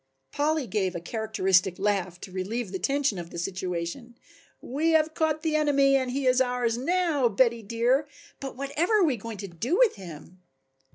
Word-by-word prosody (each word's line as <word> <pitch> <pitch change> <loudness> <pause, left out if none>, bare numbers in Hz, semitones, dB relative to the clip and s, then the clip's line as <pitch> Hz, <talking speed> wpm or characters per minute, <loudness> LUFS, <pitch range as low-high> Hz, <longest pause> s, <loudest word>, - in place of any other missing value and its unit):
Polly 300 0 0
gave 190 -5 -1
a - - -2
characteristic 190 -2 +1
laugh 190 -3 -1
to 190 - -9
relieve 195 +3 -3
the 190 - -4
tension 275 -3 0
of 170 -1 -7
the - - -9
situation. 185 +6 -4 0.4
"We 310 +6 0
have 315 0 +3
caught 315 -1 0
the 315 -2 0
enemy 280 -2 +3
and 260 -2 +1
he 270 +2 -2
is 255 0 +4
ours 245 -2 0
now, 300 -1 +1
Betty, 235 +2 +2
dear, 235 +7 +1 0.3
but 270 -1 -6
whatever 315 +10 +1
are - - +5
we 285 -6 +1
going 225 0 -7
to 200 - -6
do 195 - -2
with - - +4
him?" 180 0 -11
240 Hz, 180 wpm, -27 LUFS, 190-285 Hz, 0.4 s, are